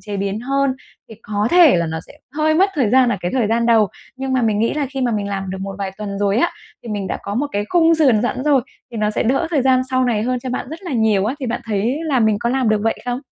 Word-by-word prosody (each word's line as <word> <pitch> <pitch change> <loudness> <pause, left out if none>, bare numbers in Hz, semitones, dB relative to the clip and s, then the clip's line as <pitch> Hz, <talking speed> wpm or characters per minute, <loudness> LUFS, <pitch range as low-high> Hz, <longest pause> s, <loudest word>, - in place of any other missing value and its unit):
chế 205 -2 -6
biến 200 +2 -2
hơn. 275 +2 0 0.4
Thì 225 - -10
có 210 +1 -1
thể 345 - +6
là 170 -1 0
nó 160 0 -3
sẽ - - -14 0.2
hơi 310 0 +2
mất 385 +4 +3
thời 255 -8 +1
gian 255 0 +5
ở 215 - 0
cái 175 - -2
thời 245 -4 +2
gian 230 +2 +1
đầu, 225 -3 +4 0.3
nhưng 265 0 -3
mà 255 -2 +1
mình 215 -2 +1
nghĩ 230 +5 +1
là 290 -2 -1
khi 270 -1 -4
mà 245 -2 +1
mình 205 -1 -2
làm 195 -1 -4
được 190 - -5
một 195 0 -5
vài 195 -1 -3
tuần 200 -2 -5
rồi 200 0 +1
á, 340 - +2 0.3
thì 235 - -10
mình 205 -3 -3
đã - - -3
có 200 - -5
một 280 +5 0
cái 205 0 -1
khung 330 -1 +4
sườn 260 -9 +3
sẵn 255 +1 -2
rồi, 285 -3 +4 0.3
thì 235 - -7
nó 210 -1 0
sẽ - - -1
đỡ 265 +7 +1
thời 290 -6 +1
gian 260 -1 +4
sau 255 0 +2
này 220 -4 0
hơn 250 +1 -1
cho 255 - -5
bạn 250 - -3
rất 320 +4 -8
là 350 -7 -5
nhiều 220 -4 +2
á. 245 +6 -1
Thì 260 - -3
bạn 240 +1 -2
thấy 225 +5 -1
là 275 -5 +1
mình 220 -2 +3
có 235 - 0
làm 255 -3 +1
được 215 -1 +3
vậy 225 - 0
không? 245 +1 -2
235 Hz, 305 wpm, -19 LUFS, 210-265 Hz, 0.4 s, thể